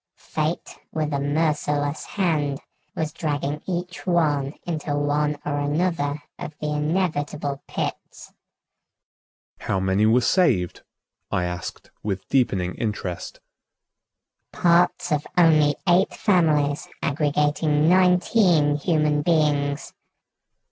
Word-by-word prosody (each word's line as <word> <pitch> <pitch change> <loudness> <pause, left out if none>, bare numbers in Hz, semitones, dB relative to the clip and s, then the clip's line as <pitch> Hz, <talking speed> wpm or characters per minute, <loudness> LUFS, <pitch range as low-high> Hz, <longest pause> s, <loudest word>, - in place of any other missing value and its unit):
Fate, - - -3
with 155 -1 -2
a 140 - 0
merciless 145 0 0
hand, 150 -8 -1 0.4
was 155 -2 -2
dragging 150 -2 -2
each 180 0 -4
one 150 -5 +1
into 155 -4 -2
one 145 +1 0
or 145 -1 -1
another 145 -1 -1 0.2
of 155 - -7
the 150 0 -2
inevitable 150 -3 -1
pits." - - -5 1.3
"How 95 - -1
many 95 +3 +2
were 115 +3 +5
saved?" 120 - +2 0.5
I 90 - 0
asked 90 0 -6
with 100 -3 -4
deepening 95 -9 +1
interest. 105 -6 -4 1.1
"Parts 175 0 +2
of 150 0 0
only 155 -4 +5
eight 180 +2 +3
families 155 -7 +2 0.2
aggregating 150 +1 +1
nineteen 180 -4 +4
human 150 -2 +1
beings." 145 -3 +1
150 Hz, 100 wpm, -23 LUFS, 145-165 Hz, 1.3 s, were